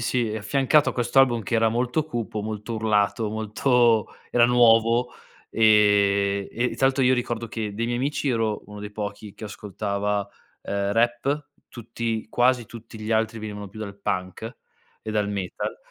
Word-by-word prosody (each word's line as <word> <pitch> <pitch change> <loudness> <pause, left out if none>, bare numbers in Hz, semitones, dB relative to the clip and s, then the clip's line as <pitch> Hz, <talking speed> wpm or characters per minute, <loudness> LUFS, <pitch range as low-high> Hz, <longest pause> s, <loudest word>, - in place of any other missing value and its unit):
sì, 120 0 0
è 110 - -3
affiancato 135 +7 +2
a - - -7
questo 120 +2 0
album 120 -4 +4
che 115 - -3
era 115 0 +3
molto 125 +6 0
cupo, 115 -7 -4
molto 110 +2 -5
urlato, 105 0 +1
molto 110 +1 +2 0.2
era 120 -1 +5
nuovo, 120 0 +4 0.4
ehm, 100 -2 +3
e 120 +2 -1
tra 135 - +3
l'altro 135 0 +1
io 130 0 +4
ricordo 120 -2 -2
che 105 -2 -4
dei 115 +2 -2
miei 120 0 -1
amici 140 +2 -1
io 125 - +2
ero 110 -2 -1
uno 105 0 -10
dei 105 0 -7
pochi 105 -1 -6
che - - -9
ascoltava, 100 0 -3 0.4
ehm, 100 0 -2
rap, 120 +6 0 0.2
tutti 115 -1 -4
quasi 120 0 +2
tutti 115 -1 -11
gli 110 +1 -5
altri 110 0 0
venivano 105 -1 -6
più 110 +3 -11
dal 100 -2 -7
punk 95 +5 -4 0.5
e 110 - -5
dal 105 -1 0
metal. 100 - -4
110 Hz, 175 wpm, -24 LUFS, 105-120 Hz, 0.5 s, era